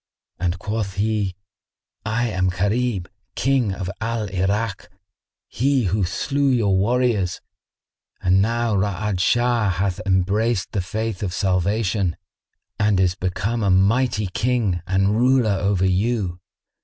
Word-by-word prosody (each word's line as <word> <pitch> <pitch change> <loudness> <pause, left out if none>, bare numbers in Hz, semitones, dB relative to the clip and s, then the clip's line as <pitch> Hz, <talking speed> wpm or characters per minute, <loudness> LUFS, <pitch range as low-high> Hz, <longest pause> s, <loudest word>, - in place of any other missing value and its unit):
and 90 0 -1
quoth 105 -1 -3
he, 105 -2 0 0.7
"I 110 +3 0
am 95 -3 0
Gharib, 100 +1 -1 0.3
King 130 -6 +1
of 95 -1 -4
Al 115 -2 -2
Irak, 95 +3 -1 0.6
he 135 +1 +1
who 100 0 +1
slew 140 +10 0
your 110 -7 +2
warriors; 105 -2 +1 0.8
and 95 +1 +3
now 115 +1 0
Ra'ad 100 0 -1
Shah 120 +1 +2
hath 95 0 -1
embraced 100 +3 +1
the 100 - -1
Faith 110 +2 -3
of 95 -3 -3
Salvation 95 -1 0 0.6
and 105 -2 +2
is 90 -2 +3
become 100 +6 -2
a 100 - +1
mighty 105 +4 +2
King 105 -2 0
and 95 +2 +2
ruler 125 -2 +3
over 100 -1 +1
you. 95 -1 0
100 Hz, 125 wpm, -22 LUFS, 95-115 Hz, 0.8 s, and